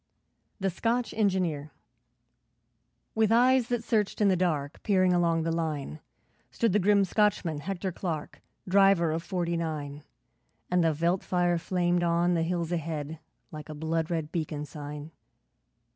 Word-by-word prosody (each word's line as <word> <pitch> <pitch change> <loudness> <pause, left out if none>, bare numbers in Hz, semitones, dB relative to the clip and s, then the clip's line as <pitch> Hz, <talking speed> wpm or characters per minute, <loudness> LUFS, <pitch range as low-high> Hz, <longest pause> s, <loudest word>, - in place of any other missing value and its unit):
The 195 -1 0
Scotch 230 +7 -1
Engineer 185 -8 0 1.4
With 220 -1 +2
eyes 250 +1 +4
that 240 -2 -1
searched 215 -3 0
in 205 -2 +4
the 190 - +3
dark, 155 -5 -1
Peering 185 -3 +3
along 170 -2 +2
the 165 - -1
line, 155 -2 -3 0.5
Stood 230 -5 0
the 210 - +4
grim 200 +1 +4
Scotchman, 190 -6 +1
Hector 190 +3 -3
Clark, 165 -4 -5 0.3
Driver 195 -3 +4
of 160 +1 -2
'Forty 170 -1 -2
nine', 150 -3 -4 0.7
And 180 -1 +3
the 165 - +3
veldt 170 +5 0
fire 175 -1 +1
flamed 175 0 0
on 170 +1 +2
the 165 - +1
hills 170 0 -1
ahead, 160 -2 -3 0.3
Like 155 -1 -9
a 155 - -6
blood 160 +1 -1
red 160 -3 -2
beacon 155 -3 -3
sign. 150 +1 -8
170 Hz, 145 wpm, -28 LUFS, 160-195 Hz, 1.4 s, eyes